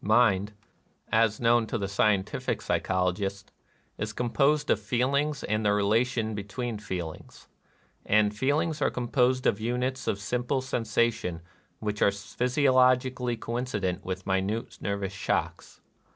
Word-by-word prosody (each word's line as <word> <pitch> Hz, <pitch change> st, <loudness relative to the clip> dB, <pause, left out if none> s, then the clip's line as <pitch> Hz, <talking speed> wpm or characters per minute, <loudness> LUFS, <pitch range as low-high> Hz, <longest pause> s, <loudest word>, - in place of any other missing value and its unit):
Mind, 105 Hz, -2 st, +3 dB, 0.6 s
as 110 Hz, -1 st, +3 dB
known 115 Hz, -1 st, +3 dB
to 120 Hz, -, -2 dB
the 100 Hz, -3 st, -2 dB
scientific 100 Hz, +1 st, 0 dB
psychologist, 95 Hz, +1 st, -1 dB, 0.5 s
is 110 Hz, 0 st, -3 dB
composed 140 Hz, +6 st, +1 dB
of -, -, +3 dB
feel 125 Hz, +5 st, 0 dB
ings 145 Hz, 0 st, 0 dB
and 105 Hz, +1 st, -1 dB
the 105 Hz, -, +3 dB
relations 110 Hz, +2 st, +1 dB
between 105 Hz, +3 st, -4 dB
feelings; 90 Hz, -6 st, -7 dB, 0.6 s
and 105 Hz, 0 st, +3 dB
feelings 150 Hz, +6 st, 0 dB
are -, -, +3 dB
composed 125 Hz, +1 st, +1 dB
of 100 Hz, -, +2 dB
units 125 Hz, +3 st, -2 dB
of -, -, +1 dB
simple 125 Hz, +6 st, -1 dB
sen 130 Hz, -3 st, -3 dB
sation 105 Hz, -6 st, 0 dB, 0.4 s
which 105 Hz, -1 st, -4 dB
are -, -, +6 dB
physiologically 125 Hz, +3 st, +2 dB
coincident 115 Hz, -7 st, -3 dB
with 95 Hz, 0 st, -5 dB
minute 95 Hz, +4 st, -1 dB
nervous 100 Hz, -1 st, -2 dB
shocks. -, -, -3 dB
110 Hz, 130 wpm, -28 LUFS, 100-125 Hz, 0.6 s, are